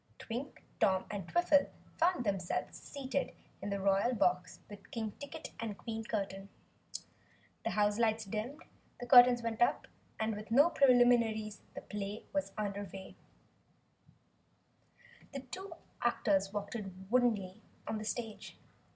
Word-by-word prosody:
Twink, 250 Hz, +4 st, -6 dB, 0.2 s
Tom, 190 Hz, -1 st, +3 dB
and 195 Hz, -4 st, -4 dB
Twiffle 310 Hz, -5 st, +4 dB, 0.3 s
found 335 Hz, -6 st, +2 dB
themselves 195 Hz, -4 st, -2 dB
seated 275 Hz, -1 st, -3 dB, 0.3 s
in 200 Hz, -, -3 dB
the 200 Hz, 0 st, -1 dB
Royal 195 Hz, +5 st, +2 dB
Box 180 Hz, -3 st, +1 dB
with 205 Hz, -1 st, -12 dB
King 220 Hz, -2 st, -3 dB
Ticket 300 Hz, +2 st, -7 dB
and 215 Hz, -3 st, -4 dB
Queen 225 Hz, -1 st, -5 dB
Curtain. 195 Hz, -3 st, -3 dB, 1.1 s
The -, -, 0 dB
houselights 215 Hz, +1 st, +2 dB
dimmed, 225 Hz, +10 st, -4 dB, 0.4 s
the 245 Hz, -, -5 dB
curtains 245 Hz, -1 st, +8 dB
went 230 Hz, -1 st, -3 dB
up, 240 Hz, -, +3 dB, 0.3 s
and 220 Hz, 0 st, 0 dB
with 210 Hz, +1 st, -8 dB
no 285 Hz, +9 st, +6 dB
preliminaries 240 Hz, -5 st, +4 dB
the -, -, -5 dB
play 205 Hz, +1 st, -5 dB
was 195 Hz, 0 st, -1 dB
under 205 Hz, -1 st, -2 dB
way. 190 Hz, -1 st, -9 dB, 2.4 s
Two 385 Hz, +1 st, -6 dB, 0.3 s
actors 200 Hz, -5 st, +2 dB
walked 205 Hz, +1 st, -4 dB, 0.4 s
woodenly 245 Hz, -4 st, +4 dB
forward 185 Hz, +3 st, -10 dB, 0.3 s
on 220 Hz, -, -1 dB
the -, -, -5 dB
stage. 225 Hz, -1 st, -5 dB
220 Hz, 130 wpm, -34 LUFS, 200-245 Hz, 2.4 s, curtains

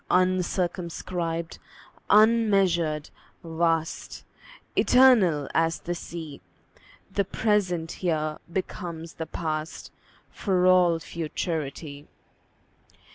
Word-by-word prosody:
Uncircumscribed, 175 Hz, -2 st, -1 dB, 0.5 s
unmeasured, 195 Hz, -8 st, +3 dB, 0.3 s
vast, 165 Hz, -1 st, -1 dB, 0.5 s
Eternal 210 Hz, -, +5 dB
as 165 Hz, 0 st, +2 dB
the 175 Hz, -, -3 dB
Sea, 165 Hz, -4 st, -8 dB, 0.7 s
The 200 Hz, +1 st, +1 dB
present 185 Hz, -5 st, 0 dB
here 155 Hz, -4 st, -2 dB
becomes 170 Hz, -3 st, -5 dB
the 160 Hz, -, -6 dB
past, 155 Hz, 0 st, -4 dB, 0.4 s
For 185 Hz, -3 st, 0 dB
all 180 Hz, -2 st, +5 dB
futurity. 155 Hz, -3 st, -5 dB
170 Hz, 75 wpm, -26 LUFS, 160-185 Hz, 0.7 s, Eternal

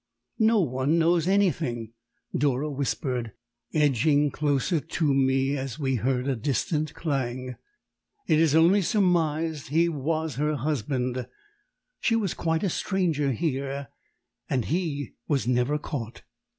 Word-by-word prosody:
"No 220 Hz, -1 st, +4 dB
one 135 Hz, +1 st, +1 dB
knows 170 Hz, 0 st, +3 dB
anything!" 155 Hz, -, +1 dB, 0.4 s
Dora 145 Hz, +2 st, +1 dB
whispered, 130 Hz, -4 st, -2 dB, 0.4 s
edging 145 Hz, 0 st, +3 dB
closer 150 Hz, +4 st, +1 dB
to 155 Hz, -1 st, 0 dB
me 135 Hz, +1 st, +2 dB
as 135 Hz, -1 st, -4 dB
we 135 Hz, -4 st, 0 dB
heard 125 Hz, +2 st, 0 dB
a 135 Hz, -, +1 dB
distant 150 Hz, +5 st, -1 dB
clang. 130 Hz, -4 st, -2 dB, 0.7 s
"It 155 Hz, -, +3 dB
is 160 Hz, -2 st, +3 dB
only 175 Hz, +5 st, +5 dB
surmised 165 Hz, -6 st, +1 dB
he 165 Hz, +5 st, +2 dB
was 155 Hz, -2 st, -2 dB
her 150 Hz, +1 st, +1 dB
husband 130 Hz, -2 st, -2 dB, 0.7 s
she 230 Hz, -, +2 dB
was 205 Hz, -6 st, 0 dB
quite 165 Hz, +1 st, -1 dB
a -, -, +2 dB
stranger 165 Hz, -9 st, 0 dB
here 140 Hz, 0 st, -2 dB, 0.6 s
and 125 Hz, -4 st, 0 dB
he 155 Hz, -4 st, -2 dB
was 140 Hz, -5 st, 0 dB
never 125 Hz, +4 st, +2 dB
caught." 125 Hz, -6 st, -6 dB
145 Hz, 125 wpm, -26 LUFS, 130-160 Hz, 0.7 s, only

